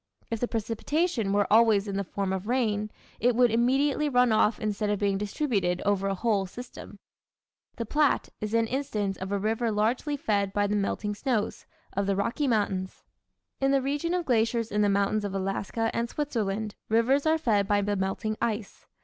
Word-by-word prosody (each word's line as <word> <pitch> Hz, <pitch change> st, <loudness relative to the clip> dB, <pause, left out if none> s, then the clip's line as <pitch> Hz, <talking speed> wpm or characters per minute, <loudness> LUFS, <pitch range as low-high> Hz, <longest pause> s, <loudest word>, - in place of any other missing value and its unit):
If 230 Hz, -, -1 dB
the 245 Hz, -, 0 dB
precipitation 230 Hz, -, -1 dB
were 205 Hz, 0 st, +3 dB
always 220 Hz, -3 st, +5 dB
in 200 Hz, -, -3 dB
the 200 Hz, -, 0 dB
form 195 Hz, 0 st, -3 dB
of 190 Hz, +2 st, -4 dB
rain 215 Hz, -4 st, 0 dB, 0.3 s
it 245 Hz, +1 st, +2 dB
would 245 Hz, -1 st, +4 dB
immediately 270 Hz, +6 st, +2 dB
run 250 Hz, -2 st, +4 dB
off 215 Hz, 0 st, +3 dB
instead 210 Hz, -1 st, -1 dB
of 205 Hz, -, +1 dB
being 200 Hz, -1 st, 0 dB
distributed 200 Hz, -5 st, -1 dB
over 195 Hz, -1 st, +1 dB
a 195 Hz, -, 0 dB
whole 200 Hz, -2 st, 0 dB
season. 245 Hz, +7 st, -10 dB, 0.8 s
The 230 Hz, -, -4 dB
Platte 295 Hz, +5 st, +1 dB
is 215 Hz, +1 st, -2 dB
an 230 Hz, 0 st, +3 dB
instance 220 Hz, -6 st, -2 dB
of 190 Hz, +1 st, -6 dB
a 200 Hz, -, +1 dB
river 225 Hz, +3 st, 0 dB
largely 235 Hz, +8 st, 0 dB
fed 200 Hz, -6 st, 0 dB
by 205 Hz, 0 st, +2 dB
the 205 Hz, +1 st, 0 dB
melting 205 Hz, +1 st, -1 dB
snows 220 Hz, -1 st, -2 dB, 0.3 s
of 200 Hz, 0 st, -1 dB
the 200 Hz, -, +1 dB
Rocky 235 Hz, +9 st, 0 dB
Mountains. 200 Hz, -5 st, -1 dB, 0.6 s
In 270 Hz, -, +2 dB
the 275 Hz, 0 st, +4 dB
region 290 Hz, +6 st, -1 dB
of 355 Hz, -2 st, -1 dB
glaciers 230 Hz, -1 st, +1 dB
in 210 Hz, +1 st, +1 dB
the 205 Hz, -, +3 dB
mountains 200 Hz, +1 st, +1 dB
of 200 Hz, -1 st, -3 dB
Alaska 195 Hz, +4 st, -1 dB
and 235 Hz, 0 st, -1 dB
Switzerland 220 Hz, -8 st, -2 dB, 0.2 s
rivers 255 Hz, +7 st, +3 dB
are 320 Hz, +1 st, +4 dB
fed 215 Hz, -10 st, +1 dB
by 205 Hz, -1 st, +2 dB
the 205 Hz, 0 st, 0 dB
melting 195 Hz, +3 st, -2 dB
ice. 215 Hz, -3 st, -3 dB
215 Hz, 190 wpm, -27 LUFS, 200-245 Hz, 0.8 s, always